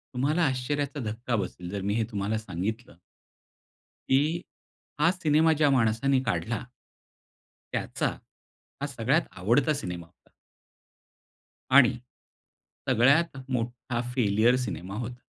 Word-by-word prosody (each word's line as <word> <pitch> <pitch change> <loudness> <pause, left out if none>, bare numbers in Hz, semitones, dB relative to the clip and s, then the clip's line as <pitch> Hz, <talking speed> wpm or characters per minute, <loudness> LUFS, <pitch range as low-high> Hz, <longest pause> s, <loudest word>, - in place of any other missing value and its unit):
तुम्हाला 150 +7 +1
आश्चर्याचा 140 +2 -2
धक्का 115 +3 -2
बसेल, 90 -3 -4
जर 100 0 -4
मी 100 +1 -1
हे 115 - +2
तुम्हाला 105 +2 -1
सांगितलं. 110 +3 -4 1.1
की 150 +6 +2 0.6
हा 170 - +6
सिनेमा 160 -2 +3
ज्या 150 -1 +3
माणसाने 130 +2 +2
काढला, 115 0 -2 1.1
त्याचा - - -1 0.7
हा 145 - -1
सगळ्यात 135 +5 +1 0.2
आवडता 120 +11 +2
सिनेमा 90 - -5
होता. 90 - -32 1.4
आणि 130 -2 +7 1.0
सगळ्यात 140 +6 +4
मोठा 120 0 -2
फेल्युअर 115 0 +3
सिनेमा 100 -6 -4
होता. 120 +1 -5
125 Hz, 105 wpm, -27 LUFS, 110-140 Hz, 1.4 s, आणि